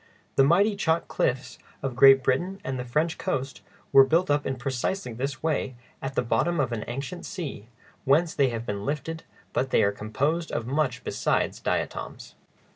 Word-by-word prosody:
The 135 Hz, -, +6 dB
mighty 195 Hz, +9 st, +4 dB
chalk 165 Hz, -4 st, 0 dB
cliffs 130 Hz, +1 st, -1 dB, 0.2 s
of 135 Hz, -3 st, -2 dB
Great 135 Hz, 0 st, +7 dB
Britain 180 Hz, +11 st, 0 dB
and 130 Hz, -1 st, -3 dB
the -, -, -2 dB
French 155 Hz, +8 st, -1 dB
coast 135 Hz, +1 st, -3 dB, 0.3 s
were 135 Hz, -, +9 dB
built 160 Hz, +4 st, +2 dB
up 145 Hz, 0 st, +1 dB
in 135 Hz, -, -1 dB
precisely 130 Hz, +3 st, -3 dB
this 130 Hz, +3 st, -4 dB
way 150 Hz, -5 st, -1 dB, 0.3 s
at 135 Hz, 0 st, -4 dB
the -, -, +1 dB
bottom 135 Hz, +9 st, +1 dB
of 130 Hz, -3 st, +1 dB
an 110 Hz, -2 st, -3 dB
ancient 140 Hz, +8 st, -5 dB
sea, 155 Hz, -, -6 dB, 0.4 s
whence 160 Hz, +5 st, +3 dB
they 140 Hz, -2 st, +3 dB
have 115 Hz, -1 st, -4 dB
been 100 Hz, -2 st, -4 dB
lifted, 150 Hz, +4 st, -4 dB, 0.3 s
but 130 Hz, -, 0 dB
they -, -, +3 dB
are 100 Hz, -, +3 dB
composed 140 Hz, +11 st, -2 dB
of 115 Hz, -, -2 dB
much 135 Hz, -1 st, -1 dB
besides -, -, 0 dB
diatoms. -, -, -3 dB
135 Hz, 180 wpm, -26 LUFS, 125-160 Hz, 0.4 s, were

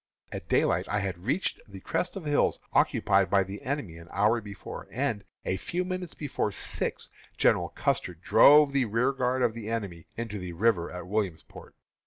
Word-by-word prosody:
At -, -, -7 dB
daylight -, -, +2 dB
I 105 Hz, -, 0 dB
had 95 Hz, -2 st, -4 dB
reached 165 Hz, +8 st, 0 dB
the 100 Hz, -2 st, -10 dB
crest 180 Hz, -, -2 dB
of 190 Hz, -5 st, -6 dB
hills 145 Hz, -1 st, +2 dB, 0.2 s
occupied 95 Hz, -2 st, +3 dB
by 100 Hz, 0 st, +4 dB
the 100 Hz, +2 st, -8 dB
enemy 130 Hz, -, -3 dB
an 85 Hz, 0 st, -12 dB
hour 110 Hz, +4 st, +2 dB
before, 100 Hz, -2 st, -8 dB
and, 115 Hz, -4 st, -2 dB, 0.2 s
a 95 Hz, -, 0 dB
few 175 Hz, -, -3 dB
minutes 185 Hz, -2 st, -4 dB
before 140 Hz, -7 st, -2 dB
six, -, -, -3 dB, 0.3 s
General -, -, +3 dB
Custer 90 Hz, -, -1 dB
drove 145 Hz, -, +6 dB
the 135 Hz, -2 st, +2 dB
rearguard 125 Hz, +3 st, +1 dB
of 120 Hz, -2 st, +2 dB
the 110 Hz, -1 st, -6 dB
enemy 100 Hz, -8 st, -4 dB
into 115 Hz, -3 st, -4 dB
the 90 Hz, -1 st, -6 dB
river 90 Hz, -2 st, +2 dB
at 90 Hz, -2 st, -7 dB
Williamsport. 95 Hz, -4 st, -4 dB
110 Hz, 175 wpm, -28 LUFS, 95-135 Hz, 0.3 s, drove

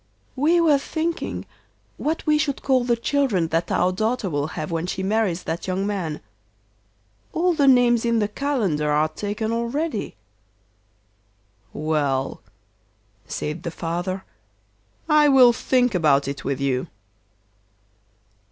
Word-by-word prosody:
'We 325 Hz, +6 st, +3 dB
were 305 Hz, -4 st, +4 dB
thinking 325 Hz, +3 st, -3 dB, 0.5 s
what 315 Hz, +2 st, -2 dB
we 300 Hz, -1 st, +3 dB
should 280 Hz, -3 st, -2 dB
call 260 Hz, -2 st, +2 dB
the 240 Hz, -1 st, +2 dB
children 230 Hz, -, 0 dB
that 165 Hz, +2 st, -1 dB
our 180 Hz, +1 st, +2 dB
daughter 215 Hz, 0 st, -1 dB
will 145 Hz, 0 st, -1 dB
have 155 Hz, +2 st, -4 dB
when 165 Hz, +1 st, -2 dB
she 190 Hz, +1 st, -3 dB
marries 195 Hz, -3 st, 0 dB
that 165 Hz, +3 st, -4 dB
young 190 Hz, +1 st, -1 dB
man. 180 Hz, -7 st, -3 dB, 1.1 s
All 355 Hz, +2 st, +2 dB
the 290 Hz, -4 st, +2 dB
names 245 Hz, -3 st, +5 dB
in 235 Hz, -1 st, +1 dB
the 210 Hz, -2 st, +1 dB
calendar 210 Hz, -, -1 dB
are 150 Hz, +1 st, +2 dB
taken 210 Hz, +6 st, -3 dB
already.' 235 Hz, +3 st, -2 dB, 1.6 s
'Well,' 145 Hz, -4 st, -1 dB, 0.9 s
said 150 Hz, +2 st, -4 dB
the 170 Hz, -, -4 dB
father, 175 Hz, +3 st, -4 dB, 0.8 s
'I 300 Hz, -1 st, +5 dB
will 255 Hz, -3 st, +7 dB
think 250 Hz, 0 st, +1 dB
about 145 Hz, -6 st, +3 dB
it 140 Hz, 0 st, -5 dB
with 140 Hz, 0 st, -2 dB
you. 135 Hz, -2 st, -1 dB
205 Hz, 130 wpm, -23 LUFS, 165-265 Hz, 1.6 s, will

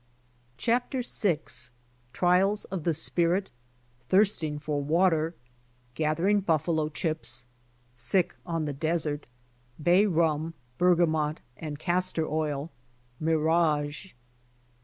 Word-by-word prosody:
CHAPTER 245 Hz, +2 st, 0 dB
VI 175 Hz, -10 st, +1 dB, 0.7 s
TRIALS 185 Hz, -, +2 dB
OF 185 Hz, -5 st, -5 dB
THE 170 Hz, -, +2 dB
SPIRIT. 175 Hz, +4 st, +1 dB, 0.3 s
— 120 Hz, +1 st, -36 dB
I'HIRSTING 185 Hz, -7 st, +2 dB
FOR 145 Hz, -1 st, -2 dB
WATER. 165 Hz, +1 st, +2 dB, 0.3 s
— 125 Hz, 0 st, -36 dB
GATH 155 Hz, +3 st, 0 dB
ERING 205 Hz, +4 st, +3 dB
BUFFALO 160 Hz, -2 st, +1 dB
CHIPS. 155 Hz, -5 st, -3 dB, 0.2 s
— 120 Hz, -, -37 dB, 0.2 s
SICK 145 Hz, +10 st, +1 dB
ON 165 Hz, -3 st, -2 dB
THE 145 Hz, -, -2 dB
DESERT. 155 Hz, 0 st, -1 dB, 0.3 s
— 125 Hz, +4 st, -17 dB
P,AY 180 Hz, +4 st, +6 dB
RUM^ 165 Hz, -2 st, +1 dB, 0.3 s
BERGAMONT^ 160 Hz, -4 st, +3 dB, 0.2 s
AND 150 Hz, -2 st, -6 dB
CASTOR 175 Hz, 0 st, 0 dB
OIL. 150 Hz, 0 st, -2 dB, 0.2 s
— 125 Hz, 0 st, -36 dB
MIRAGE. 155 Hz, 0 st, +1 dB
160 Hz, 115 wpm, -28 LUFS, 150-175 Hz, 0.7 s, P,AY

